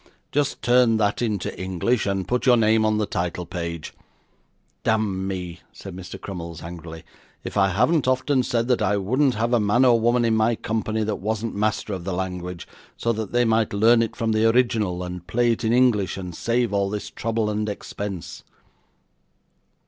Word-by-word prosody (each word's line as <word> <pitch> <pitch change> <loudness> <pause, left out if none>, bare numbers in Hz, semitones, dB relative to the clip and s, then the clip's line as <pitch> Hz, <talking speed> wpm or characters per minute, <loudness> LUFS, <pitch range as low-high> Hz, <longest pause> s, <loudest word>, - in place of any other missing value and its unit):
Just 145 -1 -1
turn 120 -2 +4
that 105 +1 0
into 105 -6 -2
English, 95 +5 0
and 95 -1 -1
put 125 +2 0
your 125 -1 +6
name 110 0 +3
on 110 0 +2
the 105 - +1
title 90 -3 -3
page. 85 -2 -5 0.9
Damn 100 -4 0
me,' 90 -3 -5
said 95 -3 -10
Mr. 90 -1 -8
Crummles, 85 -3 -7
angrily, 85 -1 -8 0.4
'if - - -6
I 95 -1 +4
haven't 130 - +2
often 130 +1 +2
said 120 -2 -1
that 125 - +2
I 100 +2 +2
wouldn't 130 +7 +1
have 115 +3 0
a 120 - +4
man 105 +5 +3
or 120 -2 +5
woman 120 +1 +2
in 115 -1 +2
my 110 +2 +2
company 110 0 -2
that 105 -1 -2
wasn't 110 +3 -3
master 105 0 -1
of 90 -2 -5
the 95 +1 -3
language, 90 -1 -4 0.3
so 115 - 0
that 110 -2 -4
they 120 0 +3
might 110 -2 +1
learn 115 +3 +5
it 115 - -2
from 115 -2 -1
the 110 +1 +3
original, 110 -7 +1
and 90 -1 -7
play 120 0 +2
it 115 - -2
in 110 - +1
English, 115 -7 +3
and 90 -2 -6
save 115 +4 0
all 100 -1 +1
this 105 0 -5
trouble 115 -1 -1
and 105 0 -2
expense. 100 -2 -6
110 Hz, 185 wpm, -23 LUFS, 95-115 Hz, 0.9 s, your